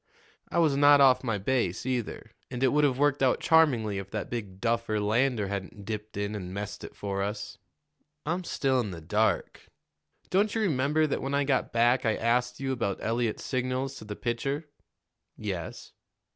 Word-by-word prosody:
I - - -2
was 160 -5 +4
not 145 0 +7
off 130 -2 +5
my 115 -4 0
base, 100 -3 -1
either, 125 -3 -3 0.2
and 125 +1 -3
it 130 - +5
would 150 +3 +2
have 135 -3 +2
worked 145 0 +2
out 130 -1 +3
charmingly 125 - +3
if 95 0 -8
that 105 0 -5
big 105 -6 -5
duffer, 115 -1 0
Lander, 110 +1 +1
hadn't 100 0 -6
dipped 105 0 -5
in 100 +1 -2
and 90 -4 -5
messed 100 +2 -5
it - - -9
for 100 -1 -3
us." 105 +1 -4 0.7
"I'm 175 +4 -1
still 135 -6 +1
in 115 -4 -1
the 85 -3 -7
dark." 105 +7 0 0.6
"Don't 205 +3 +2
you 225 - +1
remember 155 -4 +2
that 150 - -1
when 135 +1 -2
I 140 - +2
got 135 -2 0
back 120 +2 +3
I 110 -2 +2
asked 125 +2 0
you 135 0 -2
about 115 -6 -1
Eliot's 115 0 -1
signals 130 +1 -1
to - - -10
the 105 0 -6
pitcher?" 135 +7 -2 0.7
"Yes." 95 -6 -5
120 Hz, 185 wpm, -28 LUFS, 105-135 Hz, 0.7 s, not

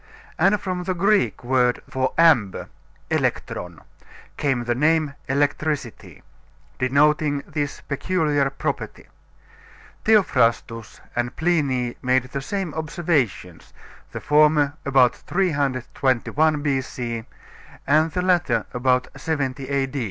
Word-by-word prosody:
And 195 +5 +4
from 180 -2 -4
the 185 0 -1
Greek 195 -1 +1
word 125 -1 +2
for 130 0 -1
amber 150 - +3 0.4
elektron 85 -3 -2 0.5
came 135 -4 0
the 120 0 0
name 150 +2 +1 0.2
electricity, 135 - -2 0.6
denoting 145 +2 +2
this 145 -2 -4
peculiar 145 -2 0
property. 135 - -5 1.0
Theophrastus 120 - +1
and 120 0 -2
Pliny 140 -8 0
made 130 0 +2
the 140 - -3
same 190 +1 -4
observations; 150 - -2 0.4
the - - -5
former 150 -1 +3
about 130 -3 +4
321 145 -2 0
B.C., 125 -5 -2 0.6
and 155 +3 +3
the 180 - -1
latter 170 - +1
about 125 0 +1
70 135 -4 -3
A. 140 -1 +1
140 Hz, 100 wpm, -22 LUFS, 125-160 Hz, 1.0 s, And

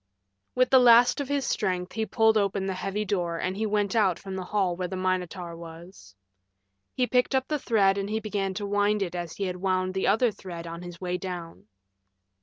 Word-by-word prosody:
With 255 0 +2
the 260 - +8
last 245 +2 +6
of 280 - -4
his 285 -1 -1
strength 180 -4 -1
he 220 -1 -2
pulled 220 +2 +3
open 200 -2 +1
the 190 - -1
heavy 195 +3 -3
door 175 -4 -1
and 185 +2 -2
he 215 +2 -1
went 205 -1 0
out 195 -6 +3
from 195 -1 -7
the 185 -1 -4
hall 190 -2 0
where 180 0 -3
the 190 - -5
Minotaur 185 -2 -2
was. 165 - -12 0.8
He 255 - +2
picked 250 +2 +1
up 265 0 +1
the 300 -1 -1
thread 200 -5 +2
and 195 +1 -3
he 220 +1 -1
began 200 -3 -3
to 205 +1 -3
wind 205 0 +1
it 175 -3 -5
as 175 -2 -5
he 200 - -3
had 180 -1 -3
wound 185 0 0
the 190 - -1
other 225 +4 +3
thread 175 -4 -8
on 170 0 -7
his 175 -1 -9
way 180 -1 -3
down. 175 - -7
195 Hz, 215 wpm, -27 LUFS, 180-215 Hz, 0.8 s, the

